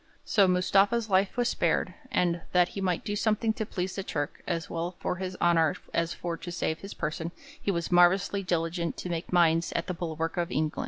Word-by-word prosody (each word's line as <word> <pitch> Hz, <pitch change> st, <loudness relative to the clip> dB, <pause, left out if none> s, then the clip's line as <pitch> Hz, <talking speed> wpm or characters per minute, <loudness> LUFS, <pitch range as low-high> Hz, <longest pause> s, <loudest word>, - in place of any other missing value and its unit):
So 200 Hz, -3 st, +4 dB
Mustafa's 195 Hz, +5 st, +3 dB
life 190 Hz, +4 st, +2 dB
was 245 Hz, -1 st, +2 dB
spared, -, -, +1 dB, 0.2 s
and 175 Hz, -8 st, +1 dB
'that 180 Hz, -1 st, +4 dB
he 195 Hz, -, -6 dB
might 180 Hz, -3 st, -1 dB
do 205 Hz, -1 st, -2 dB
something 220 Hz, +1 st, +1 dB
to 220 Hz, -1 st, -4 dB
please 185 Hz, -2 st, -3 dB
the 195 Hz, -, -2 dB
Turk, 145 Hz, -5 st, -3 dB
as 165 Hz, -2 st, -2 dB
well 170 Hz, +2 st, -3 dB
for 180 Hz, -, -2 dB
his 185 Hz, 0 st, -4 dB
honour 165 Hz, -3 st, +3 dB, 0.2 s
as 170 Hz, 0 st, +1 dB
for 170 Hz, -1 st, -4 dB
to 175 Hz, -, -7 dB
save 165 Hz, -2 st, -2 dB
his 195 Hz, -, -8 dB
person, 165 Hz, +2 st, -3 dB, 0.3 s
he -, -, -2 dB
was 170 Hz, -3 st, -1 dB
marvellously 180 Hz, +3 st, +4 dB
diligent 170 Hz, -2 st, -1 dB
to 180 Hz, -, -5 dB
make 170 Hz, 0 st, -4 dB
mines 165 Hz, -2 st, +3 dB
at 170 Hz, -, -1 dB
the 180 Hz, -, -3 dB
bulwark 165 Hz, -1 st, -3 dB
of 175 Hz, -1 st, 0 dB
England.' 155 Hz, 0 st, -1 dB
175 Hz, 210 wpm, -28 LUFS, 165-195 Hz, 0.3 s, So